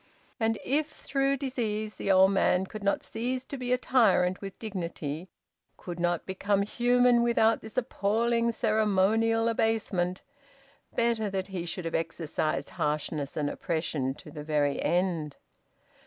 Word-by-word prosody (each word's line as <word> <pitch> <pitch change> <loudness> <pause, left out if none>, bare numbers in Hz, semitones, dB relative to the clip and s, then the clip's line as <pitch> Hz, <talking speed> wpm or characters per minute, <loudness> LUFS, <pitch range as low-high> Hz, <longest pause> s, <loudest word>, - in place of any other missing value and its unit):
And 225 -1 +1
if 295 +3 +1
through 275 0 -1
disease, 220 -5 -2
the 195 - -1
old 190 0 +6
man 190 -1 +2
could 215 +2 -8
not 200 - +1
cease 250 +3 -3
to - - -6
be 250 -2 -4
a 250 - +4
tyrant 220 -8 +3
with 195 -1 -7
dignity, 175 -5 -5 0.5
could 175 -1 -7
not 175 -1 0
become 200 +1 0
human 245 +2 +3
without 230 -1 +3
this 220 +1 -11
appalling 235 0 +1
ceremonial 220 +1 +2
abasement 210 -5 0 0.7
better 230 -3 +1
that 190 0 -3
he 180 -3 -4
should 175 +1 -4
have 165 - -3
exercised 155 -3 -2
harshness 150 -1 -1
and 150 -1 0
oppression 150 -4 -2
to - - -12
the 150 -2 -7
very 150 -2 0
end! 170 -5 0
200 Hz, 140 wpm, -28 LUFS, 175-230 Hz, 0.7 s, old